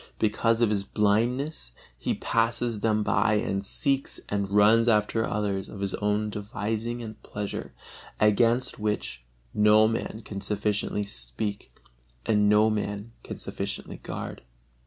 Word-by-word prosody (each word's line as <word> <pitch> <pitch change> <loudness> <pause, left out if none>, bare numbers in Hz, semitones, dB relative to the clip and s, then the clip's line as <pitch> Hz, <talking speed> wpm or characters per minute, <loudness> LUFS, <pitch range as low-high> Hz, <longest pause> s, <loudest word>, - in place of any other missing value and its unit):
because 115 +2 +2
of 115 -3 +4
his 100 -2 0
blindness, 110 - 0 0.2
he - - -2
passes 115 0 0
them 110 0 +2
by 105 - +2
and 100 -1 -1
seeks 135 +6 0
and 100 -1 -1
runs 105 +3 +5
after 110 0 +3
others 100 -2 -2
of 100 - -9
his 100 -1 -2
own 105 +1 0
devising 110 +3 -3
and 110 -1 -9
pleasure, 105 -1 -5 0.5
against 115 +4 +3
which 105 - -2 0.3
no 105 +1 +6
man 115 0 -3
can 100 -1 -6
sufficiently 105 0 -1
speak 100 0 -4 0.5
and 105 -2 +3
no 105 +1 +5
man 105 0 -2
can - - -7
sufficiently - - -5
guard. - - -6
105 Hz, 135 wpm, -27 LUFS, 105-115 Hz, 0.5 s, no